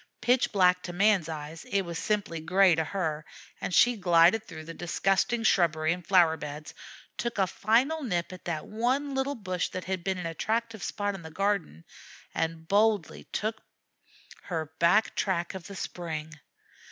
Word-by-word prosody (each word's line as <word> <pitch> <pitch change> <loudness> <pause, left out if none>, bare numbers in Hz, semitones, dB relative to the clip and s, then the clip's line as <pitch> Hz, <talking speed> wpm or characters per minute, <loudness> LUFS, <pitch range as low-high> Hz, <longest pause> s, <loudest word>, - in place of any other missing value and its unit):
Pitch 250 +1 +2
black 180 -3 +4
to 175 - -6
man's 195 -3 +3
eyes, 155 +1 -6
it 200 -1 0
was 170 -2 -5
simply 205 -6 -1
gray 180 +3 +4
to 160 0 +1
her, 155 -3 -2 0.4
and - - -3
she 245 +6 +5
glided 175 +1 +4
through 155 - -9
the 165 +1 -8
disgusting 195 +7 0
shrubbery 165 -6 +3
and 180 0 -8
flower 170 -3 +4
beds, 150 0 -7 0.4
took 235 -1 -3
a 195 - +4
final 240 - +1
nip 180 -9 -2
at 185 - -12
that 160 -3 -3
one 255 +6 -1
little 270 +1 -1
bush 185 -5 -2
that 185 - -5
had 185 -1 -3
been 190 0 -1
an 180 - -5
attractive 220 +6 -2
spot 205 +4 -2
in 195 - -8
the 160 - -9
garden, 190 - -1 0.5
and 160 0 -2
boldly 205 -2 +1
took 220 +1 -3 0.8
her 160 -4 -4
back 190 +6 +4
track 175 -3 -1
of 190 -2 -8
the 200 - -9
spring. 160 -4 -5
185 Hz, 170 wpm, -28 LUFS, 165-210 Hz, 0.8 s, she